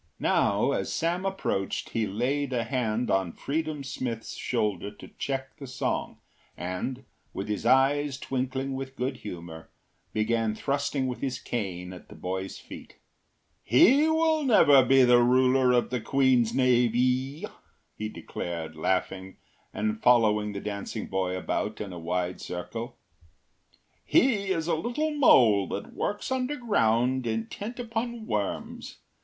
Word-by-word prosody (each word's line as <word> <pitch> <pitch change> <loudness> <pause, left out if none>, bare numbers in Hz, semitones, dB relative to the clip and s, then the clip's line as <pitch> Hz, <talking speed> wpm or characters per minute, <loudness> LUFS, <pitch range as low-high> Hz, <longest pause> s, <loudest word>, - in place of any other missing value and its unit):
Now - - +2
as - - -2
Sam 175 +3 -1
approached 145 - -2
he 110 -2 0
laid 130 +6 -1
a 120 -2 0
hand 120 -1 -1
on 95 -3 +1
Freedom 155 0 -3
Smith’s 120 -4 -5
shoulder 105 -1 -1
to 105 - -13
check 135 -1 -3
the 140 - -8
song, 125 - -3 0.4
and, 95 +9 -4 0.3
with 95 - -4
his 105 +2 -2
eyes 135 +2 +3
twinkling 130 +1 -3
with 135 0 -6
good 130 0 -2
humour, 85 -5 -9 0.4
began 110 0 0
thrusting 140 +1 -1
with 125 -1 -4
his 130 -2 -2
cane 95 -8 -4
at 90 - -13
the - - -12
boy’s 95 +1 -4
feet. - - -12 0.7
“He 270 - +5
will 315 -1 +2
never 145 - +6
be 130 +1 +5
ruler 125 +1 +4
of 120 -1 +2
the 125 -2 -1
queen’s 130 -1 +3
navee,” 125 +2 +2 0.5
he 110 0 -4
declared, 85 -6 -6
laughing 95 +3 -2 0.3
and 110 +1 -2
following 105 -4 +3
the 100 - -5
dancing 105 +1 -5
boy 95 -1 -2
about 105 +3 -2
in 100 -3 -5
a 85 - -7
wide 90 +2 -2
circle. 115 +7 -6 1.1
“He 210 -7 +3
is 165 -4 0
a - - +1
little 245 - -1
mole 120 - +5
that 100 - -6
works 205 +5 -3
underground 130 - +1
intent 115 - -4
upon 235 -1 -4
worms. 105 - -4
125 Hz, 135 wpm, -27 LUFS, 105-140 Hz, 1.1 s, never